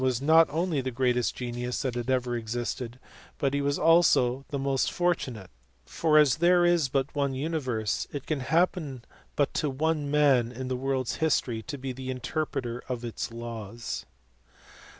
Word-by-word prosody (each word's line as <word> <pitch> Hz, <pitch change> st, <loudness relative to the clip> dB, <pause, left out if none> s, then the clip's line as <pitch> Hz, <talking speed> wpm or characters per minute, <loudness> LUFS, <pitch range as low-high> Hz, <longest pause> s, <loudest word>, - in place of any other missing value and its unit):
was 130 Hz, -2 st, +1 dB
not 160 Hz, +4 st, +5 dB
only 160 Hz, -1 st, 0 dB
the 130 Hz, -, -3 dB
greatest 125 Hz, -1 st, 0 dB
genius 125 Hz, +1 st, -3 dB
that 130 Hz, -3 st, -1 dB
had 120 Hz, +1 st, -4 dB
ever 125 Hz, -2 st, +1 dB
existed 120 Hz, +1 st, -4 dB, 0.4 s
but 140 Hz, -1 st, 0 dB
he 140 Hz, -, +1 dB
was 140 Hz, 0 st, 0 dB
also 145 Hz, -6 st, +4 dB
the 140 Hz, -, -2 dB
most 135 Hz, -1 st, 0 dB
fortunate, 130 Hz, -, -1 dB, 0.3 s
for 155 Hz, -, +2 dB
as 150 Hz, -5 st, +5 dB
there 175 Hz, +1 st, +4 dB
is 170 Hz, -6 st, +3 dB
but 135 Hz, +1 st, -1 dB
one 140 Hz, -2 st, 0 dB
universe, 130 Hz, -8 st, -2 dB
it 145 Hz, -2 st, -5 dB
can 155 Hz, -3 st, -1 dB
happen 155 Hz, -3 st, 0 dB, 0.3 s
but 145 Hz, -, +1 dB
to 150 Hz, -, 0 dB
one 150 Hz, +1 st, -1 dB
man 140 Hz, -5 st, +3 dB
in 130 Hz, +1 st, -6 dB
the 130 Hz, -, -1 dB
world 130 Hz, 0 st, -1 dB
s -, -, -2 dB
history 135 Hz, -7 st, 0 dB
to 135 Hz, +6 st, -6 dB
be 135 Hz, 0 st, -4 dB
the 130 Hz, +1 st, -7 dB
interpreter 125 Hz, -1 st, -3 dB
of 120 Hz, -1 st, -3 dB
its 115 Hz, 0 st, -4 dB
laws. 115 Hz, -1 st, -6 dB
130 Hz, 170 wpm, -28 LUFS, 120-150 Hz, 0.4 s, not